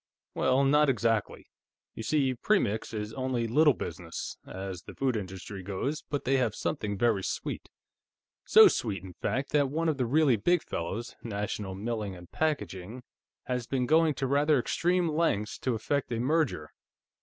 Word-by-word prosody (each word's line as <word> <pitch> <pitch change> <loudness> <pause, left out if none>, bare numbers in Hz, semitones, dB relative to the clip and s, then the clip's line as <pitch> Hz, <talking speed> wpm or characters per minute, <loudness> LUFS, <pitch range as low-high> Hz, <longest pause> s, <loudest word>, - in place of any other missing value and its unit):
"Well, 130 +1 +2
not 150 +1 +4
exactly. 115 -4 0 0.5
You - - -7
see, 135 +2 +1
Premix 120 - 0
is 105 -1 -4
only 130 -3 -1
Little 145 +5 +4
Business, - - -6
as 95 -2 -6
the - - -12
foods 130 -5 0
industry 95 +1 -7
goes, 100 +11 -3
but 145 - -2
they 135 +2 +3
have 120 -5 0
something 100 -2 -2
very 110 -3 +2
sweet. - - -4 0.7
So 440 -1 +8
sweet, 105 - -1
in 95 -2 -9
fact, 135 +10 -2
that 145 -2 +3
one 165 +4 -1
of 150 - 0
the 125 -3 0
really 140 -2 +4
big 175 - +2
fellows, 95 +8 -4
National 105 -3 -4
Milling 105 -2 -3
& - - -56
Packaging, 125 - -2 0.4
has 125 -2 -3
been 130 -2 0
going 160 +2 +4
to 135 - -2
rather 145 +3 +3
extreme 175 +7 +1
lengths 150 -10 0
to 125 -3 -1
effect 130 +4 -1
a 115 - -1
merger. 135 - 0
125 Hz, 165 wpm, -29 LUFS, 105-145 Hz, 0.7 s, So